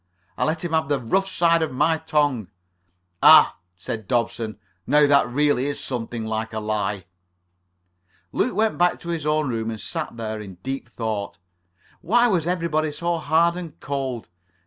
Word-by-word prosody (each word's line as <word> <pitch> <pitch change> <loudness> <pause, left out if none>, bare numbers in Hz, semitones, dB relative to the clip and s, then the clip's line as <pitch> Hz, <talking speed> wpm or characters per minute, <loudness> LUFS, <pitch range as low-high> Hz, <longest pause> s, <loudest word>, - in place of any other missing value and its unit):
I - - 0
let 160 +2 -1
him 170 - -3
have 160 -3 +1
the 145 -2 +1
rough 190 +12 0
side 170 -2 +3
of 160 - -1
my 160 +5 +1
tongue." 145 - 0 0.7
"Ah," - - +7 0.2
said 95 +4 -6
Dobson, 115 -3 -1 0.3
"now 150 +2 +5
that 140 -2 +4
really 140 +1 +1
is 145 - -3
something 120 -2 -4
like 110 0 -3
a 110 - -2
lie." 105 -3 -2 1.3
Luke - - 0
went 220 -1 +1
back 175 0 +3
to 170 - -8
his 165 -3 -2
own 155 -1 +1
room 115 -2 -2
and 110 -1 -5
sat 160 -5 -5
there 110 -1 -4
deep 120 +9 -6
in - - -27
thought. 110 -4 -4 0.6
Why 235 +8 +3
was 175 -7 +1
everybody 165 -3 0
so 170 +3 -2
hard 165 +2 +2
and 170 -4 -8
cold? 135 -4 -4
145 Hz, 170 wpm, -23 LUFS, 115-165 Hz, 1.3 s, Ah